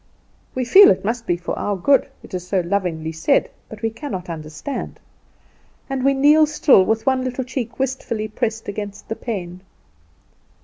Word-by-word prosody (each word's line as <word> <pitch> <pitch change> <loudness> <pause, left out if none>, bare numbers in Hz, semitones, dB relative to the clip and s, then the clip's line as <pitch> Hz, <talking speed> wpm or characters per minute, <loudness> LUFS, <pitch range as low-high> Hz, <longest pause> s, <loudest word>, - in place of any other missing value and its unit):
We 255 -1 -1
feel 390 +11 +8
it 190 0 +1
must 230 +2 -2
be 175 - +1
for 175 - -4
our 205 - -1
good, 265 +9 +3
it - - -14
is 180 -1 -5
so 190 -1 +1
lovingly 170 -3 -2
said: 160 0 +1 0.2
but 220 -1 -11
we 225 - 0
cannot 205 - -6
understand; 155 - -6 0.9
and 265 -1 -2
we 275 0 +3
kneel 300 +3 +5
still 290 -8 +5
with 220 +3 0
one 260 -1 +2
little 255 0 -3
cheek 245 -2 -5
wistfully 250 -5 -2
pressed 220 0 -3
against 205 0 -6
the 225 - -2
pane. 185 -7 -5
220 Hz, 170 wpm, -21 LUFS, 185-260 Hz, 0.9 s, feel